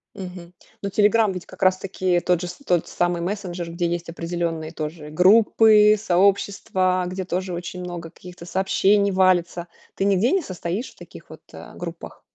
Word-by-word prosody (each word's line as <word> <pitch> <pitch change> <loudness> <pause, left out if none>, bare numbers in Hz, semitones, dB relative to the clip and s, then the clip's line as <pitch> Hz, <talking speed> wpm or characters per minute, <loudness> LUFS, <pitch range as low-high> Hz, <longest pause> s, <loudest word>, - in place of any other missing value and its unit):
Мгм. 180 -3 -9 0.3
Но 200 - -3
"Телеграм" 210 +1 +3
ведь 180 -2 -7
как - - -8
раз-таки 185 -1 +1
тот 175 -1 0
же 180 - -4
са 180 +10 -10
тот 175 -7 +1
самый 175 -1 -1
мессенджер, 180 -3 -4
где 170 0 -1
есть 170 0 -4
определенные 165 -1 -4
тоже 155 -1 -6
группы, 210 +4 +5
сообщества, 190 -1 +1
где 185 +1 -4
тоже 185 0 -3
очень 175 +1 -6
много 175 -2 -7
каких-то 180 0 -13
сообщений 195 +2 +2
валится. 175 -2 +1 0.3
Ты - - -2
нигде 200 +5 +2
не 385 - +2
состоишь 185 - -5
в - - -23
таких - - -14
вот, - - -12
э, - - -11
группах? - - -8
180 Hz, 165 wpm, -22 LUFS, 175-195 Hz, 0.3 s, группы